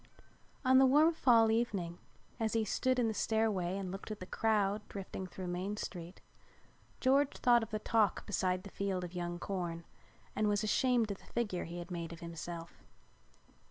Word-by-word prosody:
On 260 0 +7
the 265 - +7
warm 305 +5 +5
fall 230 -7 +5
evening 195 -7 -1 0.4
as 220 -1 0
he 225 -1 +1
stood 255 +5 +1
in 240 -2 +2
the 220 - 0
stairway 210 -5 0
and 190 -2 -4
looked 195 +3 -7
at 215 -1 -5
the 185 - -6
crowd 210 0 +1
drifting 190 -1 -6
through 185 +1 -7
Main 180 +4 -3
Street, 175 -3 -7 0.8
George 275 +2 +3
thought 240 -1 +5
of 225 - -5
the 215 - -2
talk 215 -1 +1
beside 185 -2 0
the 200 - -10
field 190 -2 -2
of 175 0 -6
young 175 -1 -3
corn 175 -3 -4 0.5
and 215 0 +2
was 205 +1 +1
ashamed 235 0 +2
of 195 - -6
the - - -18
figure 210 -7 -1
he 170 +1 -7
had 175 +1 -7
made 170 -1 -4
of 170 - -8
himself. 170 0 -7
200 Hz, 185 wpm, -34 LUFS, 180-225 Hz, 0.8 s, On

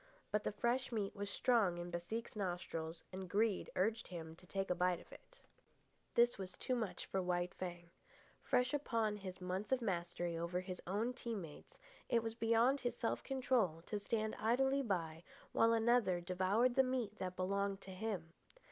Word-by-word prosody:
But 210 0 +1
the - - 0
fresh 240 +5 0
meat 210 -4 -1
was 200 0 -3
strong 200 -6 +3
in 175 0 -5
Baseek's 195 +8 -4
nostrils, 175 -4 -3
and 190 -1 -5
greed 210 0 +2
urged 220 +4 +1
him 165 -3 -7
to 180 - -17
take 195 0 -1
a - - +5
bite 180 0 +2
of - - -15
it. - - -16 0.8
This 240 -2 +5
was 185 -1 -5
too 255 - -1
much 230 -5 -2
for 190 - -1
White 180 0 0
Fang. 175 -2 -6 0.5
Fresh 250 +1 +2
upon 230 -7 +1
his 190 -2 -7
months 185 +4 -3
of 260 - +4
mastery 175 -5 -1
over 170 +2 -1
his 185 -1 -6
own 215 +7 0
team 230 -5 -4
mates, 150 -3 -11 0.3
it 230 -1 +3
was 225 0 -2
beyond 230 +4 +3
his 245 -2 -1
self 230 - 0
control 245 - +1
to 210 - -2
stand 215 +1 -1
idly 265 +5 +3
by 170 -8 -2 0.3
while 230 - +5
another 225 -5 +4
devoured 190 +7 +2
the 265 - +6
meat 255 -5 -1
that 185 -1 -3
belonged 200 +1 0
to 190 - -9
him. 185 -4 -3
200 Hz, 180 wpm, -38 LUFS, 180-230 Hz, 0.8 s, the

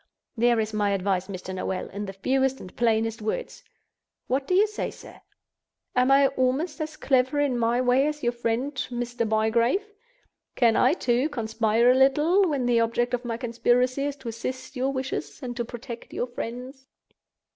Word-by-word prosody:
There 235 0 +3
is 215 0 -2
my 205 -1 +1
advice, 190 -1 -1
Mr. 190 -1 -6
Noel, 185 0 -3
in 205 +1 -5
the 195 - -6
fewest 265 +6 0
and 185 - -11
plainest 225 -1 +1
words. 220 - -4 0.6
What 270 +2 -1
do 365 - +2
you 405 +3 +6
say, 425 0 -4
sir? - - -13 0.7
Am 250 +1 +3
I 275 +1 +6
almost 275 +5 -1
as 310 0 -5
clever 260 +2 +2
in 285 -3 +1
my 235 +1 +1
way 255 +3 +3
as 300 -2 -4
your 240 - +2
friend 240 +4 -2 0.2
Mr. 240 -2 -2
Bygrave? 230 - +2 0.7
Can 230 -3 +4
I, 255 +4 +4
too, 250 -2 +1
conspire 230 -2 +2
a - - +3
little, 300 +8 +4
when 275 -5 -1
the 240 -1 +3
object 235 +2 0
of 245 0 -2
my 230 -1 -2
conspiracy 250 +2 +1
is 285 -1 -2
to 265 -4 -7
assist 255 +4 -6
your 260 +2 0
wishes 265 0 -4
and 245 -1 -4
to 240 - -2
protect 235 0 -9
your - - -1
friends?" 250 +2 -7
245 Hz, 180 wpm, -26 LUFS, 230-270 Hz, 0.7 s, you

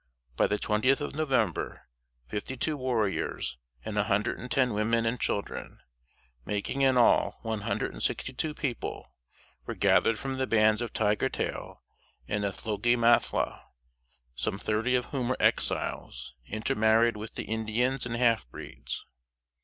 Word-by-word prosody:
By - - +3
the 105 - 0
twentieth 110 +7 +2
of 145 - -4
November, 130 - 0 0.4
fifty 105 - -4
two 155 +4 0
warriors 115 - -1 0.3
and 105 - -4
a 105 - +2
hundred 105 +1 0
and 125 - -7
ten 125 -2 +2
women 115 +2 +1
and 115 +2 0
children 100 - -3 0.7
making 105 - -2
in 130 -2 +4
all 120 - +4
one 110 -2 -2
hundred - - -2
and - - -8
sixty 130 - -1
two 150 +3 -2
people 130 -7 -4 0.5
were - - -3
gathered 115 - +4
from 135 +3 -4
the 130 0 0
bands 110 0 +4
of 120 - -3
Tiger 105 -1 +1
tail - - -4 0.4
and 105 0 -1
Nethloke 105 +4 0
Mathla; 120 0 +2 0.7
some 60 +10 -2
thirty 110 +5 0
of 125 -1 +1
whom 130 -3 -1
were 130 - 0
Exiles, - - 0
intermarried 110 +1 +2
with 105 +1 -8
the - - -4
Indians 110 +4 0
and 120 - -3
half 115 - +2
breeds. - - -7
115 Hz, 150 wpm, -29 LUFS, 105-125 Hz, 0.7 s, in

